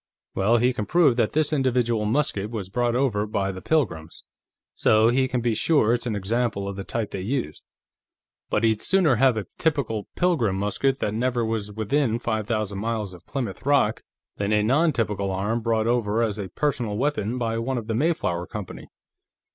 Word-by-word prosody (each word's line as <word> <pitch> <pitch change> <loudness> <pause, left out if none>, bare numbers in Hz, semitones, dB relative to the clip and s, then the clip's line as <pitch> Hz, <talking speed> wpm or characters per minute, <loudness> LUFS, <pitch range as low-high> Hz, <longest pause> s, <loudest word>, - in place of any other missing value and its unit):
Well, 105 +5 +3
he 125 +2 +2
can 105 -4 -4
prove 165 -7 +4
that 115 -3 +1
this 155 0 +1
individual 120 -5 +1
musket 105 -4 0
was 105 -5 -5
brought 120 +3 0
over 115 -6 +1
by 100 -2 -1
the 95 -1 -8
Pilgrims, 90 - -1 0.5
so 110 +1 +4
he 130 +2 +2
can 125 -1 -1
be 120 -1 +1
sure 115 -1 +3
it's 120 0 -2
an 110 - -1
example 105 0 -1
of 100 - -4
the 100 - -5
type 110 +1 -3
they 95 - -4
used. 100 - -3 0.9
But 105 - 0
he'd 110 -1 +2
sooner 175 -10 +4
have 130 -1 +4
a 105 - -3
typical 135 -10 -1
Pilgrim 155 - +1
musket 105 +7 0
that 105 - -1
never 120 +1 0
was 110 -2 -2
within 110 +3 0
five 110 -3 -2
thousand 110 -4 -2
miles 110 -3 -2
of 90 -1 -15
Plymouth 120 -7 -4
Rock 135 -6 +2 0.4
than 100 +1 -1
a 105 -1 +3
non 150 +9 +3
typical 105 -6 -1
arm 100 +5 -1
brought 110 -1 +1
over 115 -1 +1
as 110 -2 -2
a 95 -2 -5
personal 120 - -1
weapon 125 -3 -1
by 115 -2 -1
one 130 +3 -2
of 115 - -4
the 110 - -2
Mayflower 110 - 0
Company." 105 -4 -7
115 Hz, 190 wpm, -24 LUFS, 105-130 Hz, 0.9 s, prove